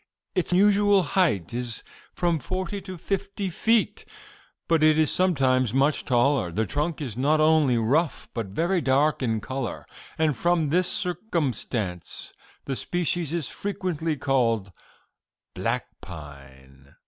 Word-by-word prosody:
Its 180 - -1
usual 200 +1 +4
height 150 - +1
is 120 -1 -2 0.3
from 170 -3 0
forty 185 +4 -4
to 185 -2 -8
fifty 195 +2 -3
feet, 225 +6 +1 0.6
but 165 -2 +3
it 155 0 +5
is 155 -1 +3
sometimes 130 - +2
much 140 +3 +2
taller. 120 -6 +2
The 110 +6 0
trunk 150 - -2
is 125 -8 -4
not 145 +5 +2
only 155 -5 +4
rough, 140 +8 +1
but 115 -4 -3
very 170 - 0
dark 140 +3 +2
in 115 -4 0
color; 130 +1 -4 0.3
and 155 -3 +2
from 170 -2 +1
this 180 +4 +2
circumstance 135 - -2 0.3
the 135 - -2
species 175 0 -1
is 165 -5 -1
frequently 170 -6 -3
called 115 -8 +1 0.8
black - - -1 0.2
pine. 70 -4 -13
150 Hz, 130 wpm, -25 LUFS, 120-175 Hz, 0.8 s, it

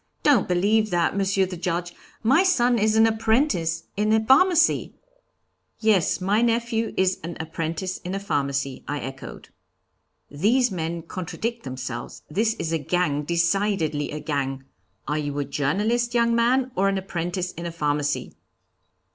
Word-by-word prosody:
Don't 280 -9 +4
believe 210 +5 +2
that, 175 -1 +1
Monsieur 195 -1 +2
the 185 0 -6
Judge, 175 0 -3 0.3
my 265 +9 +5
son 250 -11 +3
is 215 +1 +2
an 220 0 +6
apprentice 220 - +1
in 210 +1 +1
a 220 0 +3
pharmacy.' 330 +6 +4 0.8
'Yes, 215 -6 +2
my 200 +4 +1
nephew 230 -1 0
is 190 0 +2
an 170 +1 -6
apprentice 165 +3 -4
in 180 +2 -5
a - - -2
pharmacy,' 140 -7 -2
I 145 0 -2
echoed. 135 0 -8 0.8
'These 220 - +2
men 165 -2 -3
contradict 200 +7 -4
themselves; 130 -2 -6
this 220 +6 +1
is 160 - -3
a 165 - +1
gang, 150 -1 0
decidedly 170 -2 0
a 150 - -5
gang 140 -3 -3 0.4
are 150 +2 0
you 145 -1 -3
a 145 - -1
journalist, 210 - 0
young 235 0 +3
man, 250 +3 +2
or 195 +1 +2
an 195 - 0
apprentice 180 -1 -3
in 170 +1 -6
a - - -4
pharmacy?' 145 -2 -1
185 Hz, 150 wpm, -24 LUFS, 155-220 Hz, 0.8 s, an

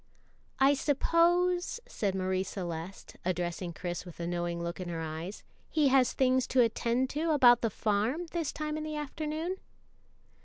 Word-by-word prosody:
"I 270 +1 +6
suppose," 345 - +2
said 195 -3 -2
Marie 185 0 0
Celeste, 180 -1 -6
addressing 175 0 -2
Chris 175 +1 -4
with 175 -2 -12
a 170 - -3
knowing 175 0 -2
look 170 +1 -4
in 180 -1 -5
her 165 -1 -3
eyes, 160 +5 -5 0.3
"he 300 -3 +3
has 260 -2 +4
things 260 -1 +2
to 255 - +4
attend 235 +2 +1
to 315 +3 -1
about 250 -6 +6
the 230 - +1
farm 220 - 0
this 335 -4 -1
time 305 0 -3
in 310 - -4
the 310 0 -4
afternoon?" 310 +4 -3
240 Hz, 160 wpm, -30 LUFS, -, 0.3 s, I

